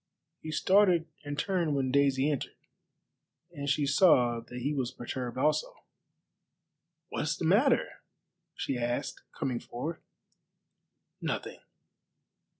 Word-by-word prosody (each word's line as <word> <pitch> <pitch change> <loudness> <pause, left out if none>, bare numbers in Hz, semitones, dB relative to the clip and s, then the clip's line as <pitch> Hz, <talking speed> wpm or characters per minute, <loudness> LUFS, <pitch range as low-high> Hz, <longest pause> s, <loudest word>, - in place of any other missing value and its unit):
He 160 - -7
started 180 +1 +4 0.2
and 145 0 -5
turned 170 -3 0
when 130 -2 0
Daisy 140 +1 +3
entered, 140 - -4 1.0
and 145 -4 -4
she 145 +1 +2
saw 135 -6 +4
that 125 +2 -8
he 145 +4 0
was 130 -4 -1
perturbed 125 0 -5
also. 150 +3 +1 1.3
"What - - -3
is - - -1
the - - -3
matter?" - - +4 0.7
she 130 - -2
asked, 120 0 -2
coming 125 -3 -2
forward. 155 +9 -6 1.2
"Nothing. - - -3
140 Hz, 115 wpm, -30 LUFS, 125-155 Hz, 1.3 s, started